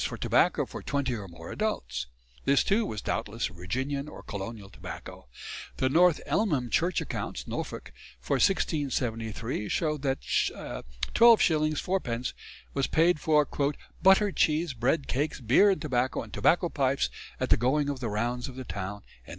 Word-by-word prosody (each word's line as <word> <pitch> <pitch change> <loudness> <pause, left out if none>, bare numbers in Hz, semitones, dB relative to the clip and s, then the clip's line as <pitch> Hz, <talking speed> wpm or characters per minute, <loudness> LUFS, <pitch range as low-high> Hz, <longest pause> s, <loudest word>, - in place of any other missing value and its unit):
for - - -3
tobacco - - +2
for - - -8
twenty 140 -3 -1
or 105 -4 -5
more 85 -1 -10
adults. 65 - -2 0.4
This 140 0 +4
too 220 +3 +2
was 105 -3 -5
doubtless 115 0 -2
Virginian 130 - -3
or - - -11
colonial 100 0 -6
tobacco. - - -9 0.5
The 130 - +2
North 170 +3 +5
Elmham 145 - 0
Church 175 +2 +2
Accounts - - -4
(Norfolk) - - -5 0.3
for - - -2
1673 120 - 0
show 155 -2 0
that 135 -1 -1
12s. 155 - +2
4 190 +5 0
d. 120 -6 -4 0.5
was 135 -1 +1
paid 165 +1 +3
for 150 -2 +3 0.5
"Butter, 195 +2 +5
cheese, 155 -2 +1
Bread, 130 +5 0
Cakes, 145 +4 -1
Beere 130 - +5
and 195 - +2
Tobacco 130 -3 0
and - - -13
Tobacco 175 +1 +3
Pipes 135 -2 +1 0.3
at - - -2
the - - +7
goeing 135 +5 +2
of 140 -2 -2
the 120 -3 -2
Rounds 120 +4 -1
of 130 - -9
the 130 -1 -7
Towne." 100 0 -5
135 Hz, 155 wpm, -28 LUFS, 115-155 Hz, 0.5 s, the